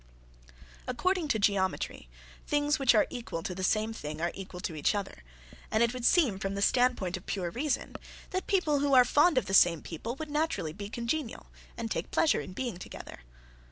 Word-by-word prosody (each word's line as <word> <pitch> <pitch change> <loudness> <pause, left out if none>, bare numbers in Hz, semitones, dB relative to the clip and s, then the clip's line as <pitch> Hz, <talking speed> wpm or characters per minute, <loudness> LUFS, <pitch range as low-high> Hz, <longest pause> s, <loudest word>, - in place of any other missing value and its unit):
According 355 +6 0
to 255 - +1
geometry, 195 - 0 0.4
"things 295 +1 +1
which 260 -3 +4
are 215 - +5
equal 230 -9 -5
to 180 - -3
the 190 +1 -5
same 215 +3 +1
thing 150 -8 -6
are 170 +1 0
equal 190 -2 -8
to 170 - -3
each 150 +5 +1
other," 200 - -5 0.5
and 220 +2 +3
it 235 0 +1
would 250 -1 -4
seem, 255 - +4
from 195 0 -3
the 200 - -3
standpoint 245 -8 +2
of 185 - -14
pure 180 -4 -2
reason, 275 - -2 0.4
that 370 -1 -3
people 320 -7 +2
who 280 -1 +3
are 250 -1 +8
fond 295 +5 +4
of 255 - +2
the 190 - -4
same 175 -4 +5
people 220 +9 -5
would 310 +1 -7
naturally 300 - -1
be 200 +3 -7
congenial 235 +3 -4 0.3
and 230 -2 -4
take - - -2
pleasure 320 - +2
in 185 - -9
being 240 -2 -4
together. 175 - -9
230 Hz, 195 wpm, -30 LUFS, 190-285 Hz, 0.5 s, are